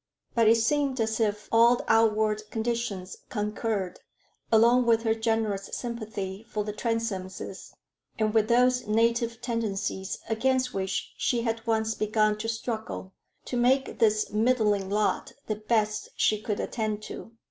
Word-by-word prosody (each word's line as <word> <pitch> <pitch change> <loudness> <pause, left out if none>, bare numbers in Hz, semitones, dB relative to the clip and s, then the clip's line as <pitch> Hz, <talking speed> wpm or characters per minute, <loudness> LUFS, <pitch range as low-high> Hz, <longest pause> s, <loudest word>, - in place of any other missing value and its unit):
But 230 -2 +3
it 225 - +7
seemed 265 +3 +1
as 220 0 0
if 210 -1 0
all 235 +2 +5
outward 215 -1 +2
conditions 225 -5 -3
concurred, 210 -3 -2 0.5
along 235 +2 +5
with 225 -1 +4
her 220 -1 +3
generous 220 -3 -1
sympathy 215 -4 -5
for 210 -1 -2
the 210 0 -4
Transomes, 205 -5 -4 0.5
and 215 -1 +1
with 220 -1 +3
those 250 0 +3
native 230 +1 +1
tendencies 210 -5 -2
against 255 +3 +1
which 190 0 -2
she 235 -2 +1
had 225 0 -2
once 220 -1 +1
begun 215 0 +1
to 225 - -3
struggle, 220 -4 -4 0.3
to - - -4
make 260 +3 +2
this 215 -2 +2
middling 210 -3 +2
lot 210 +1 0
the 215 - -2
best 215 -1 0
she 215 -1 +2
could 210 -1 -2
attain 215 -3 -2
to. 225 - -9
220 Hz, 140 wpm, -27 LUFS, 210-235 Hz, 0.5 s, it